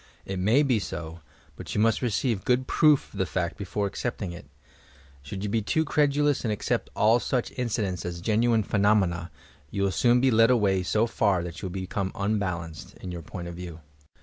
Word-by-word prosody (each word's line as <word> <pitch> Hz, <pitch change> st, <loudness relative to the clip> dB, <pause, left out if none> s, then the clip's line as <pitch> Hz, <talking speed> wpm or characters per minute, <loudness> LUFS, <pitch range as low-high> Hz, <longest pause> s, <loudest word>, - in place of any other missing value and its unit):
It 95 Hz, -1 st, -4 dB
may 110 Hz, +10 st, +4 dB
be 125 Hz, -6 st, +2 dB
so, 85 Hz, -3 st, -6 dB, 0.4 s
but -, -, -7 dB
you -, -, +1 dB
must 115 Hz, +1 st, +3 dB
receive 120 Hz, -3 st, 0 dB
good 125 Hz, +1 st, +2 dB
proof 150 Hz, -1 st, +3 dB
of -, -, -8 dB
the 95 Hz, -, +2 dB
fact 85 Hz, 0 st, -2 dB
before 100 Hz, +1 st, -3 dB
accepting 100 Hz, -2 st, -3 dB
it. 85 Hz, -5 st, -10 dB, 0.7 s
Should 95 Hz, +8 st, -6 dB
you 105 Hz, -, -2 dB
be 110 Hz, +2 st, +1 dB
too 160 Hz, +10 st, 0 dB
credulous 145 Hz, -1 st, +2 dB
and 115 Hz, -, 0 dB
accept 105 Hz, -, -1 dB
all 110 Hz, +3 st, +4 dB
such 125 Hz, +2 st, -1 dB
inci 120 Hz, -4 st, -1 dB
dents 90 Hz, -3 st, -3 dB
as 85 Hz, -1 st, -5 dB
genuine 110 Hz, +3 st, +2 dB
phenomena, 100 Hz, -5 st, +1 dB, 0.4 s
you 100 Hz, +6 st, -2 dB
will 100 Hz, -, +2 dB
soon 120 Hz, +4 st, +3 dB
be 130 Hz, +1 st, +3 dB
led 115 Hz, +1 st, +5 dB
away 100 Hz, -6 st, +3 dB
so 105 Hz, +5 st, +1 dB
far 100 Hz, -6 st, +1 dB
that 85 Hz, -1 st, -7 dB
you 95 Hz, -, -3 dB
will 90 Hz, -, -7 dB
become 95 Hz, 0 st, -3 dB
unbalanced, 90 Hz, -6 st, -3 dB
in 90 Hz, -, -7 dB
your 85 Hz, -1 st, -6 dB
point 85 Hz, +3 st, -7 dB
of 85 Hz, -, -6 dB
view. 85 Hz, -2 st, -8 dB
100 Hz, 200 wpm, -26 LUFS, 90-115 Hz, 0.7 s, led